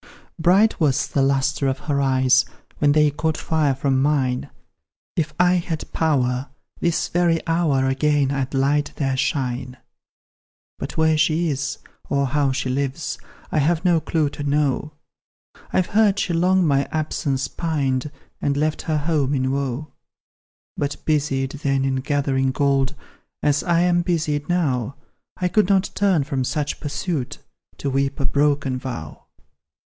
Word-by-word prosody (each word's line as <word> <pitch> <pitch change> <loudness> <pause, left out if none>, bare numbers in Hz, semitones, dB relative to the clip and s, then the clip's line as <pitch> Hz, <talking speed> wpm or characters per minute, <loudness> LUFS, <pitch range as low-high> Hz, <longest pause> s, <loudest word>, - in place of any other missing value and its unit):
Bright 190 +7 +4
was 145 -5 +2
the 140 - 0
lustre 135 +1 +1
of 130 - 0
her 140 -2 0
eyes, 130 -1 +3 0.3
When 145 -1 +4
they 150 -1 +4
caught 160 +2 -1
fire 150 -4 +1
from 135 -1 +1
mine; 135 -3 0 0.7
If 155 -2 -1
I 180 0 +5
had 165 -2 -4
power 130 -4 0 0.3
this 170 -1 0
very 170 -2 +1
hour, 165 -5 +1
Again 140 +1 +2
I'd 135 -1 -2
light 145 +2 +1
their 135 -2 -1
shine. 130 -2 -2 1.0
"But - - -6
where 160 -1 +3
she 160 +2 +2
is, 140 -2 -2 0.3
or 140 0 +1
how 140 0 +1
she 130 0 -2
lives, 135 +3 -2 0.3
I 155 - +1
have 165 +4 +1
no 175 -2 +4
clue 155 -3 0
to - - -8
know; 145 +1 0 0.8
I've 185 - +2
heard 205 0 +3
she 180 - -1
long 180 +2 +3
my 140 -2 +2
absence 145 -3 -1
pined, 145 -4 -1 0.3
And 140 0 0
left 155 +1 0
her 155 -1 0
home 145 -2 0
in 130 0 0
woe. 140 +1 -3 0.8
But 145 0 -2
busied, 140 -3 0
then, 135 -2 +1
in 135 -1 0
gathering 135 -1 0
gold, 140 +1 +1 0.5
As 145 -1 +2
I 170 -1 +2
am 175 0 +3
busied 155 -4 -1
now, 135 -8 0 0.4
I 180 - 0
could 205 +2 +2
not 195 -1 +2
turn 190 -7 +2
from 135 -2 -2
such 145 +3 -2
pursuit, 145 -2 -3 0.4
To 140 - -2
weep 135 +1 0
a 140 - -1
broken 140 -2 +1
vow. 120 - -6
145 Hz, 150 wpm, -22 LUFS, 135-160 Hz, 1.0 s, I